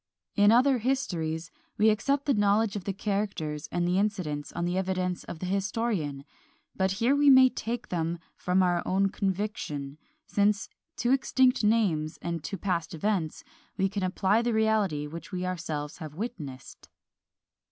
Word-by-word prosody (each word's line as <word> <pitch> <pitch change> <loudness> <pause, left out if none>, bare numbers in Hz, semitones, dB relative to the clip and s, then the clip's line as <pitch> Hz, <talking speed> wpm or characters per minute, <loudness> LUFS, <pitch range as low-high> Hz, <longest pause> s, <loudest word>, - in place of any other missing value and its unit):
In 205 +1 +6
other 255 +2 +4
histories 170 - -2 0.3
we 215 +1 +5
accept 275 +6 0
the 285 - +3
knowledge 205 0 +2
of 200 - -5
the 200 - 0
characters 195 -7 -3
and 175 0 0
the 180 +2 +2
incidents 175 -9 -2
on 170 - -2
the 175 +1 -1
evidence 185 -1 -1
of - - -7
the 180 - -5
historian; 190 -7 -1 0.5
but 190 0 +1
here 235 +8 +2
we 290 0 +5
may 260 -1 +8
take 240 0 -4
them 170 -1 -1 0.2
from 185 +1 +2
our 175 -1 +2
own 195 +1 +2
conviction, 185 -8 -3 0.3
since 205 +1 +1 0.3
to 245 -3 +1
extinct 260 -2 +3
names 190 -8 +2
and 170 -2 -4
to 195 - -4
past 170 -3 -2
events 170 -2 -1 0.3
we 195 - +2
can 200 +1 -4
apply 190 +3 +2
the 235 0 0
reality 215 -9 +1
which 165 +6 -8
we 185 -1 -3
ourselves 160 -5 -4
have 155 -3 -8
witnessed. 160 - -7
190 Hz, 160 wpm, -28 LUFS, 170-215 Hz, 0.5 s, may